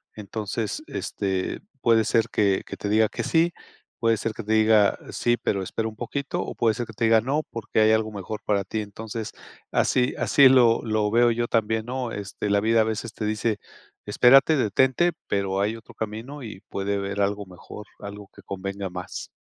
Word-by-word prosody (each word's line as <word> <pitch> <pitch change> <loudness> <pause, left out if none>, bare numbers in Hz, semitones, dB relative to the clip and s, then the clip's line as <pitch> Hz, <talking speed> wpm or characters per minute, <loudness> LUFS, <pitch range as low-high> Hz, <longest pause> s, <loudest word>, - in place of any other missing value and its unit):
entonces 110 - -4
este, 95 -2 -3 0.2
puede 115 -1 +4
ser 115 0 +2
que 100 -2 +2
que - - -7
te 100 - -4
diga 110 +1 +4
que - - -4
sí, 170 +1 +2 0.5
puede 115 -1 +2
ser 110 +1 -3
que 115 - -7
te 110 +1 -1
diga 110 -2 +4
"Sí, 120 0 +1
pero, 100 -4 -1
espera 110 +4 -3
un 110 - -7
poquito" 130 +4 -3
o - - -5
puede 115 -2 +2
ser 120 - -3
que 115 - -10
te 115 +2 -1
diga 110 0 +5
"No, 140 +6 -1
porque, 115 -1 -2
hay 110 0 +5
algo 110 0 +1
mejor 105 +1 -6
para 100 -2 +1
ti", 110 +2 -3
entonces 110 +1 -6 0.4
así 125 +1 +2
así 140 -2 +6
lo 120 -3 +5
lo 110 -2 0
veo 120 +1 +5
yo 120 +1 -1
también, 110 -1 0
¿no?, 125 -1 -3
este, 100 0 -4
la 100 0 +3
vida 110 +2 +3
a - - +4
veces 110 +1 -3
te 110 - -4
dice: 105 0 -1 0.5
"Espérate, 135 +8 +5
detente", 130 - +2 0.2
pero, 95 -1 0
hay 105 +3 0
otro 115 - -13
camino 110 +7 -6
y 105 -4 -8
puede 100 +1 -2
haber 100 0 -2
algo 100 +1 0
mejor, 95 +3 -11
algo 100 0 -8
que 100 - -13
convenga 100 +1 -5
más. 90 0 -7
110 Hz, 195 wpm, -25 LUFS, 100-115 Hz, 0.5 s, así